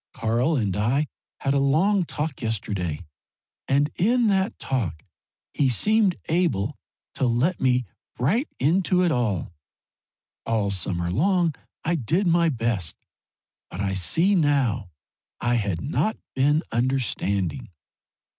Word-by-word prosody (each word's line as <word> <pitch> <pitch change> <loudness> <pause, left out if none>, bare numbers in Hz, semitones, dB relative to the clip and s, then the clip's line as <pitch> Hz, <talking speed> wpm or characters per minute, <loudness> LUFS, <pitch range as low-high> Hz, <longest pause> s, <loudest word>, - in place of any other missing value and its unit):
Karl 120 +5 +1
and 100 -6 0
I 120 +8 +1 0.4
had 135 - +1
a 140 - +2
long 170 +8 +3
talk 150 -2 -4
yesterday, 95 -7 -2 0.6
and 145 +2 +2
in 240 +5 +2
that 195 +2 +1
talk 90 - -2 0.5
he 140 -3 +2
seemed 205 - +3
able 150 - 0 0.4
to 130 - 0
let 125 +10 +1
me 125 -1 +2 0.3
right 190 - +1
into 180 +5 +2
it 175 - +2
all. 110 - -1 0.9
All 105 -3 0
summer 85 -2 -1
long 175 - +2 0.3
I 170 - 0
did 165 - 0
my 170 -1 +3
best, 115 - -1 0.7
but 90 - -8
I 100 -1 -1
see 160 - +2
now 140 - +1 0.5
I 120 0 +1
had 100 -7 -1
not 215 +8 -1 0.2
been 145 +5 +2
understanding. 115 - -1
130 Hz, 125 wpm, -24 LUFS, 105-170 Hz, 0.9 s, long